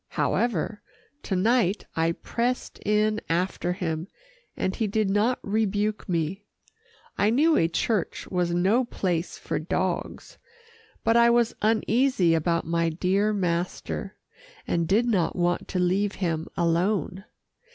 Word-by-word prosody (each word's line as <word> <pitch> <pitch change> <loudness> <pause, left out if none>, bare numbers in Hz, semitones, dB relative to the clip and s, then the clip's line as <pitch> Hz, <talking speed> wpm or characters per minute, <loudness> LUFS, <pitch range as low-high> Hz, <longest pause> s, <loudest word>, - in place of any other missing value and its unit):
However, 220 -2 0 0.4
to 195 - -2
night 215 0 +2
I 165 +1 +1
pressed 245 +7 -3
in 215 +1 +1
after 175 +1 0
him, 165 -2 -3 0.5
and 190 - -1
he 220 - 0
did 210 -1 0
not 220 +5 +2
rebuke 210 0 -1
me. 170 +3 -1 0.8
I 205 - +4
knew 305 +8 +4
a 165 - +3
church 180 +3 -1
was 180 -2 0
no 190 +9 +3
place 180 -7 -2
for - - -3
dogs, 180 +2 -3 0.6
but 225 +1 +3
I 235 0 +6
was 235 -1 +3
uneasy 220 -3 +2
about 170 +1 +1
my 170 0 +1
dear 190 +6 +1
master, 180 -3 -2 0.5
and 170 -1 0
did 215 +6 +3
not 200 -8 +1
want 175 0 0
to - - -3
leave 190 +3 +1
him 165 -4 -2
alone. 175 +2 0
195 Hz, 130 wpm, -26 LUFS, 170-215 Hz, 0.8 s, I